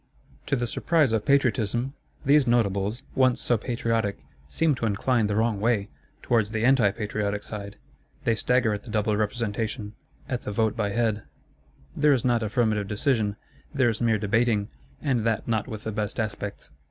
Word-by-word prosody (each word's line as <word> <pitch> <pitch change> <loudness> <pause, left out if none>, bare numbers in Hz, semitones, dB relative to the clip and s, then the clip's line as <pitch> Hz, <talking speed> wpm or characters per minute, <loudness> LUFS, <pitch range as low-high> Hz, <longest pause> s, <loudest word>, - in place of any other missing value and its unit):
To 140 - +2
the 120 -2 -1
surprise 150 +1 +1
of 110 -2 0
Patriotism, 125 -2 +2 0.3
these 145 -1 +5
Notables, 110 0 +1
once 130 -2 +3
so 120 - +2
patriotic, 115 -2 -1 0.3
seem 160 - +2
to 115 -4 -1
incline 110 +2 +1
the 105 - -1
wrong 110 -1 +1
way; 110 -2 +1 0.3
towards 115 -4 +2
the 110 +1 -1
anti 130 -5 +5
patriotic 105 -1 -3
side. 100 -2 -7 0.5
They 115 - +2
stagger 120 0 +2
at 105 - -4
the 120 - -13
Double 105 0 +1
Representation, 105 0 -2 0.3
at 125 -2 -2
the - - -5
Vote 110 +1 +1
by 105 -2 0
Head: 110 0 0 0.7
there 150 -1 +4
is 130 -3 0
not 120 -2 +2
affirmative 110 -2 0
decision; 105 -1 0 0.4
there 130 -3 +4
is 110 0 -3
mere 115 -2 +3
debating, 105 0 +1 0.3
and 130 -6 +1
that 115 -1 0
not 110 -3 0
with 110 -4 -7
the 110 - -3
best 105 +2 -3
aspects. 105 -2 -4
110 Hz, 170 wpm, -26 LUFS, 105-120 Hz, 0.7 s, these